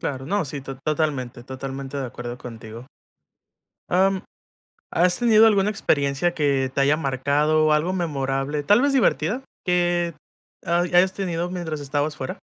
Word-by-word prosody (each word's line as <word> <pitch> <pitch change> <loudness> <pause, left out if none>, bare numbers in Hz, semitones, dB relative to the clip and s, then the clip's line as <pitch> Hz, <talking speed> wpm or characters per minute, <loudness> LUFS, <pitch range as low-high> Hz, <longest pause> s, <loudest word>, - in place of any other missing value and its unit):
Claro, 135 -1 -4
no, 200 +4 0
sí, 140 0 -5
tot 135 0 -8
totalmente 145 -6 -1
totalmente 135 +2 -6
de 135 -2 -2
acuerdo 120 0 -7
contigo. 115 0 -10 1.0
Am, 190 +1 +2 0.7
¿has 175 +1 +3
tenido 225 -2 +6
alguna 205 -2 +3
experiencia 155 -5 +1
que 140 -4 0
te - - 0
haya 140 +2 +4
marcado 150 +2 +1
algo 160 +5 +1
memorable, 145 -4 -2
tal 205 +9 +4
vez 280 +1 +2
divertida, 255 -1 +1 0.2
que, 175 -1 +1 0.5
hay 175 +1 +1
hayas 185 +2 +5
tenido 175 -3 -3
mientras 165 -4 -4
estabas 145 +2 -2
fuera? 130 - -5
150 Hz, 145 wpm, -23 LUFS, 135-180 Hz, 1.0 s, tenido